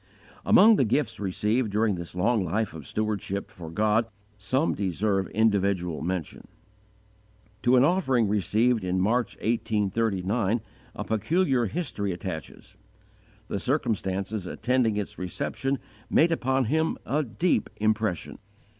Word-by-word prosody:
Among 220 0 +7
the - - +4
gifts 115 -1 0
received 105 +4 0
during 105 +1 +1
this 85 -1 -7
long 110 +3 +2
life 100 +5 -1
of 75 -4 -9
stewardship 105 -2 -3
for 85 -2 -9
God 110 +6 +2 0.3
some 130 +9 0
deserve 95 0 0
individual 100 -6 +1
mention. 90 -1 -4 1.1
To 125 +1 +4
an 125 - +6
offering 135 - +2
received 110 +3 +1
in 90 0 0
March, 115 +4 +1
1839, 110 -1 0 0.3
a - - -4
peculiar 130 - +1
history 105 - -3
attaches. 85 -3 -7 0.7
The 100 - -3
circumstances 100 - -1
attending 120 -2 +1
its 105 - -4
reception 135 +9 -2 0.3
made 165 +2 +4
upon 130 -4 +1
him 160 +7 0
a 150 +3 +1
deep 140 - 0
impression. 110 -5 -1
110 Hz, 120 wpm, -26 LUFS, 95-125 Hz, 1.1 s, Among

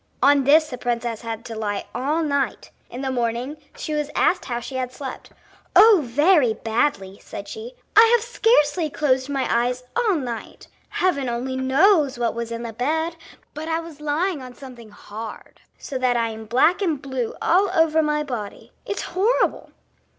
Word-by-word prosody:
On 280 0 +5
this 310 +3 +5
the 250 - -6
princess 235 -2 -2
had 225 -1 -6
to 230 - -6
lie 205 -2 -3
all 295 +6 0
night. 280 -6 -1 0.2
In 245 - -7
the 265 -1 -2
morning 245 +3 -2 0.2
she 310 - -4
was 300 -1 -1
asked 360 - +2
how 240 -1 -3
she 250 - -8
had 255 -1 -3
slept. 265 0 -8 0.5
"Oh, 415 +1 +8
very 280 -1 +3
badly!" 220 -4 -1
said - - -8
she. 470 +2 -8 0.2
"I - - +10
have 460 - 0
scarcely 350 -10 +2
closed 265 -2 0
my 275 -2 -1
eyes 245 +2 0
all 460 -5 +2
night. 245 -7 -6 0.2
Heaven 280 -9 0
only 245 +2 -3
knows 275 +2 +3
what 235 -1 0
was 235 0 -5
in 230 0 -4
the 230 -1 -6
bed, 320 +8 -1 0.4
but 310 +2 -6
I 325 0 0
was 330 -3 -10
lying 305 +2 -1
on 250 -1 -10
something 250 -5 -12
hard, 210 +1 -10 0.2
so 265 -3 -5
that 250 -1 +2
I 230 -1 0
am 220 0 -8
black 260 - +3
and 325 -7 0
blue 260 -4 -4
all 380 +4 +3
over 320 -1 +3
my 300 -1 0
body. 235 -8 -6 0.2
It's 405 - -3
horrible!" 410 +8 0
270 Hz, 180 wpm, -23 LUFS, 240-320 Hz, 0.5 s, I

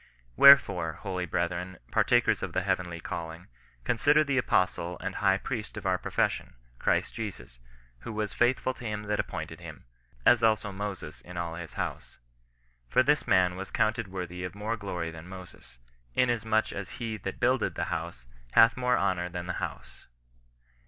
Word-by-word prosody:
Wherefore, 100 - +7
holy 90 0 -4
brethren, 90 +1 -2
par - - +4
takers - - +3
of - - -4
the 95 - 0
heavenly 90 -3 -1
calling, 85 0 -6 0.4
consider 145 - +4
the 140 -3 +1
Apostle 90 -5 0
and - - -4
High 95 -2 +3
Priest 110 +1 -5
of - - -7
our 95 -1 +2
profession, - - -1 0.2
Christ - - +1
Jesus; 85 - -7 0.4
who 115 - -7
was 105 -2 -3
faithful 125 +1 +2
to 125 - -13
him 105 -2 -3
that 105 0 -1
appointed - - -4
him, - - -10 0.4
as - - +6
also 110 -2 +2
Moses 95 -5 -6
in 90 0 -10
all 85 -1 -3
his 85 -1 -8
house. - - -5 0.7
For 130 - +4
this 145 +2 +2
man 90 -2 +4
was 95 +1 -6
counted 110 -1 0
worthy 90 -1 -5
of 90 +1 -5
more 105 +3 -2
glory 90 -6 -4
than 80 +2 -10
Moses, 90 -9 -12 0.4
inasmuch 115 -3 +2
as 100 -1 -6
he 110 -2 -3
that 95 -2 -6
builded 125 0 +1
the - - -1
house - - -5 0.3
hath 115 +1 +7
more 125 0 +2
honour 90 -2 0
than 90 0 -5
the 90 - -3
house." - - -7
95 Hz, 170 wpm, -29 LUFS, 90-110 Hz, 0.7 s, Wherefore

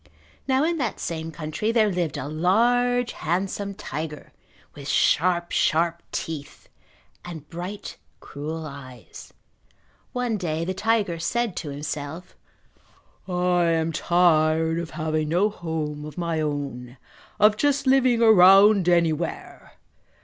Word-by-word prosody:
Now 265 +1 +2
in 335 +1 0
that 240 -6 -2
same 160 -1 -4
country 155 +8 -3
there 220 -3 +3
lived 175 -5 -2
a 130 - -4
large 240 +9 +2
handsome 195 +4 -3
tiger, 155 -3 -7 0.4
with 140 -1 -10
sharp, 175 +1 +2
sharp 170 +1 +1
teeth 155 -3 -6 0.6
and 160 -4 -9
bright, 180 +4 -7 0.2
cruel 155 +3 -6
eyes. 130 -5 -11 0.8
One 245 -3 -1
day 165 -3 -2
the 185 - -2
tiger 205 -3 0
said 225 +4 -1
to 150 - -4
himself, 150 +4 -6 0.9
"I 180 -1 +1
am 165 -1 +1
tired 160 -1 +2
of 170 -1 -5
having 155 -1 -2
no 190 +6 +2
home 155 -5 -4
of 150 -1 -10
my 170 -2 -1
own, 140 -4 -4 0.4
of 210 0 +5
just 285 +4 +1
living 255 -3 +3
around 195 -2 +7
anywhere! 170 -1 -1
170 Hz, 120 wpm, -24 LUFS, 155-205 Hz, 0.9 s, around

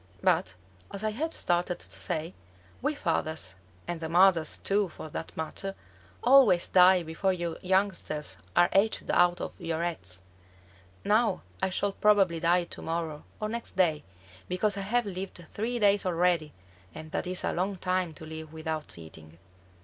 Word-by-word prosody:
"But 95 - +2 0.3
as 200 - -6
I 215 - +1
had 310 +9 -2
started 175 - +1
to - - -13
say, 165 0 -3 0.5
we 295 +3 0
fathers, 155 - -2 0.3
and 175 -1 -4
the 160 - -3
mothers 175 -2 +4
too 200 -1 +1
for 155 - -9
that 160 - -7
matter, 195 +5 -4 0.5
always 250 -10 +6
die 180 -1 +6
before 165 +4 0
you 170 -2 -4
youngsters 180 - 0 0.2
are 175 - +6
hatched 200 +3 +2
out 175 0 +4
of - - -5
your 165 0 -2
eggs. 95 - -5 0.8
Now 220 +3 +2 0.2
I 190 - +1
shall 200 +2 0
probably 195 -5 +3
die 175 +1 +3
to 170 - -9
morrow 160 -2 -3
or 215 - -2
next 230 +2 -5
day, 165 -5 +2 0.5
because 195 +3 +1
I 200 - -3
have 240 0 +2
lived 185 -2 -6
three 235 +4 -2
days 205 -2 +4
already, 175 -3 +1 0.4
and 155 0 -9
that 180 - -2
is 185 0 -2
a - - 0
long 190 +3 -1
time 180 -2 -1
to 160 - -10
live 160 0 -8
without 160 - -5
eating." 80 0 -13
180 Hz, 165 wpm, -29 LUFS, 160-200 Hz, 0.8 s, always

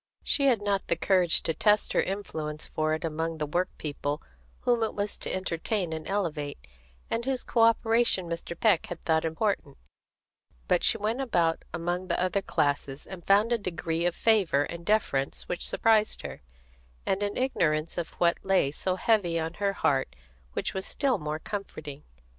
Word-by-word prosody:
She 280 -2 +2
had 230 -6 +3
not 200 -1 0
the - - +2
courage 180 -1 +3
to 165 - 0
test 210 +5 +2
her - - +4
influence 160 -6 -4
for 155 0 0
it 160 - -4
among 160 +1 -2
the 155 - -1
workpeople 150 -3 -2 0.4
whom 240 -1 +2
it 220 - -1
was 205 0 -1
to - - -3
entertain 185 0 -1
and 160 -1 -5
elevate, 165 -8 -2 0.5
and 230 - 0
whose 260 0 -1
co 235 - +1
operation 225 -3 +3
Mr. 170 0 -5
Peck 210 -7 +3
had 175 - -6
thought 160 -1 +2
important; 160 -4 -1 0.9
but - - +2
she - - +4
went 220 +5 -1
about 170 -10 +1
among 175 +2 -2
the - - 0
other 185 +2 +1
classes, 145 -5 -1
and 180 -3 -10
found 205 +4 +5
a 235 - +2
degree 170 -3 -1
of 175 - -1
favour 195 -11 +3
and 170 +3 -7
deference 170 -11 +1
which 180 - -2
surprised 220 -1 +2
her, - - -7 0.6
and 195 +1 0
an 205 0 -1
ignorance 165 -12 +1
of 175 -2 -3
what 170 -1 +2
lay 190 -8 +3
so 185 +5 -2
heavy 185 -4 +2
on 160 +1 -3
her 200 -1 +2
heart 135 - 0 0.4
which - - -2
was 190 - -3
still 270 -2 0
more 150 0 -3
comforting. 155 -6 -6
175 Hz, 175 wpm, -28 LUFS, 160-210 Hz, 0.9 s, found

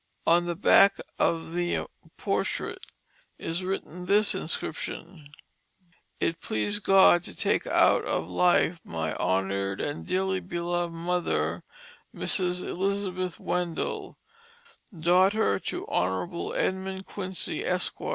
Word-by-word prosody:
On 175 +1 +4
the 175 - -2
back 200 +2 +5 0.2
of 165 0 0
the 175 0 -1 0.3
portrait - - -2 0.6
is 170 +3 -4
written 180 -2 -5
this 205 +2 +5
inscription: 160 0 -4 0.9
"It 165 0 -1
pleased 205 - -1
God 190 -3 +6
to - - -8
take - - 0
Out - - +4
of - - -1
Life 175 -1 +2
my 80 -1 -3
Honor'd 95 +1 -1
and 145 - -4
dearly 190 +1 0
Belov'd 175 -1 -2
Mother, 165 - -1 0.5
M^rs 180 -1 +2
Elizabeth 185 -2 -2
Wendell, 175 -2 -3 0.8
daughter 180 - +3
to - - -5
Honble 95 - -2
Edmund 190 0 -2
Quincy, 190 -2 -3
Esq^r. - - -1
175 Hz, 110 wpm, -27 LUFS, 165-190 Hz, 0.9 s, God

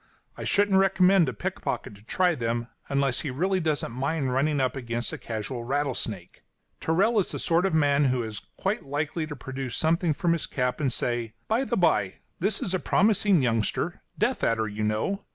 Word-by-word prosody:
I - - -6
shouldn't 200 -1 +3
recommend 190 -3 +4
a - - -2
pickpocket 105 - -4
to 100 - -15
try 180 - +1
them, 120 -3 -2 0.2
unless 140 -2 +2
he 150 - -3
really 185 +9 0
doesn't 155 -7 -1
mind 135 +1 -1
running 145 +2 +1
against 120 -3 -2
a - - -3
casual 115 +2 -4
rattlesnake. 120 -8 -3 0.4
Tyrrell 200 +8 +2
is 190 - 0
the - - -3
sort 170 +3 +2
of 165 - -1
man 145 -2 +3
who 125 -2 +1
is 110 -1 -6 0.2
quite 200 +4 -1
likely 150 +3 -2
to 150 - -6
produce 130 -2 -5
something 160 0 +1
from 170 +1 +1
his 170 - -2
cap 125 -1 -1
and 135 -3 +1
say: 120 -2 -2
"By 235 +5 +1
the 240 - -1
bye, 105 - +2 0.2
this 200 +5 +1
is 185 - -2
a 185 - +1
promising 200 -5 +3
youngster 115 -3 0 0.2
death - - 0
adder, 110 -1 +1
you 105 +1 -4
know. 110 - -1
140 Hz, 190 wpm, -26 LUFS, 120-180 Hz, 0.4 s, recommend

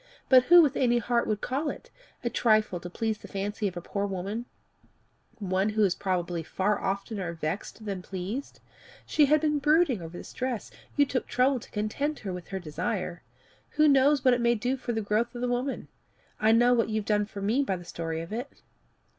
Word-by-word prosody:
"But 255 -1 +7
who 345 0 +8
with 285 -3 +1
any 240 -2 +3
heart 235 +1 +1
would 210 -2 -1
call 285 +4 -1
it - - -8 0.3
a 240 - 0
trifle 215 -5 +2
to 175 - -8
please 220 +3 -2
the - - -11
fancy 205 +1 -2
of 180 -2 -5
a - - -4
poor 200 +3 -2
woman, 200 +5 -4 0.9
one 190 -1 0
who 215 0 +1
is 190 -3 +3
probably 180 -3 -2
far 190 +5 0
oftener 195 -2 -3
vexed 170 +7 -5
than 195 -3 -3
pleased? 195 +9 -6 0.4
She 300 - +4
had 305 +2 +5
been 300 -1 +1
brooding 300 - +3
over 165 +1 -8
this - - -10
dress 255 -4 -3 0.2
you 290 - +5
took 260 -2 -2
trouble 255 +1 +2
to - - -14
content 250 +8 -2
her 195 -3 -5
with 180 -1 -7
her 195 - -4
desire. 180 +2 -3 0.6
Who 305 0 +6
knows 275 0 +4
what 255 - +6
it 245 - +1
may 235 0 +3
do 245 +4 -1
for 250 -2 -4
the 225 -1 -1
growth 220 +4 0
of 240 - -5
the 250 - 0
woman? 245 +3 -2 0.5
I 215 +1 +4
know 240 +2 +5
what 230 -2 +2
you've 215 -1 -1
done 210 -1 +1
for 200 -2 -7
me 225 +7 +2
by 230 -9 0
the 175 -1 -9
story 165 -1 -4
of 165 +5 -7
it." 245 +5 -4
215 Hz, 210 wpm, -28 LUFS, 190-255 Hz, 0.9 s, who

